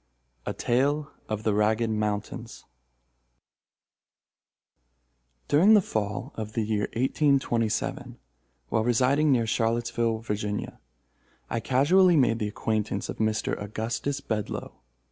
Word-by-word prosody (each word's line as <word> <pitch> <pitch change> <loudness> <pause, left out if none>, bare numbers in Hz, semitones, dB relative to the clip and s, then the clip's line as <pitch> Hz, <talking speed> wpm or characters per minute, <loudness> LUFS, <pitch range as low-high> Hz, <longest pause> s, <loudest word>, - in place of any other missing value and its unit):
A - - -1
TALE 140 +5 0 0.2
OF 110 0 -3
THE 110 - +1
RAGGED 110 +2 +1
MOUNTAINS 105 +2 -3 2.8
During 190 +9 +6
the - - +7
fall 110 +5 -3
of 110 -1 -6
the 115 - 0
year 105 -1 -1
1827, 130 -3 0 0.5
while 110 - +1
residing 130 +6 +3
near 120 -3 +3
Charlottesville, 115 0 0
Virginia, 105 -2 -4 0.7
I 115 - 0
casually 165 +9 +4
made 120 -4 +3
the 105 - -1
acquaintance 110 0 -2
of - - -5
Mr. 110 0 0
Augustus 115 +7 -3
Bedloe. 110 -6 -4
115 Hz, 105 wpm, -27 LUFS, 110-135 Hz, 2.8 s, the